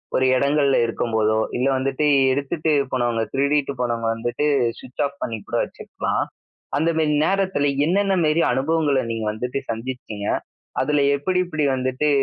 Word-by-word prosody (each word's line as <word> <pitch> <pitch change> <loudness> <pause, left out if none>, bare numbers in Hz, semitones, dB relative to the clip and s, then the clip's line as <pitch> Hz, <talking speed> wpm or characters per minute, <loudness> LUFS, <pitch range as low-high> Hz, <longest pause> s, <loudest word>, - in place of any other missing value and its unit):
ஒரு 130 - +3
எடங்கள்ல 140 0 +2
இருக்கும்போதோ, 110 -2 0 0.2
இல்ல 130 +2 +1
வந்துட்டு 135 +3 0 0.3
எடுத்துட்டு 145 +4 -1 0.2
போனவங்க, 120 -3 0
திருடிட்டு 140 0 +1
போனவங்க 115 -2 -1
வந்துட்டு 120 +6 -2 0.3
ஸ்விட்ச் 130 +3 -4
ஆஃப் 140 0 -6
பண்ணி 115 -2 -3
கூட - - -1
வச்சுக்கலாம். - - -3 0.5
அந்த 160 +3 +2
மேரி 155 -2 +2
நேரத்துல 190 -7 +1 0.2
என்னென்ன 195 +3 +2
மேரி 155 +2 +3
அனுபவங்கள 145 -1 +1
நீங்க 115 -1 -3
வந்துட்டு 125 +5 -3
சந்திச்சீங்க? 115 -3 -5 0.5
அதில 150 -1 +2
எப்படி 180 +6 0
எப்படி 155 -4 -1
வந்துட்டு 130 +3 0
135 Hz, 135 wpm, -22 LUFS, 120-150 Hz, 0.5 s, ஒரு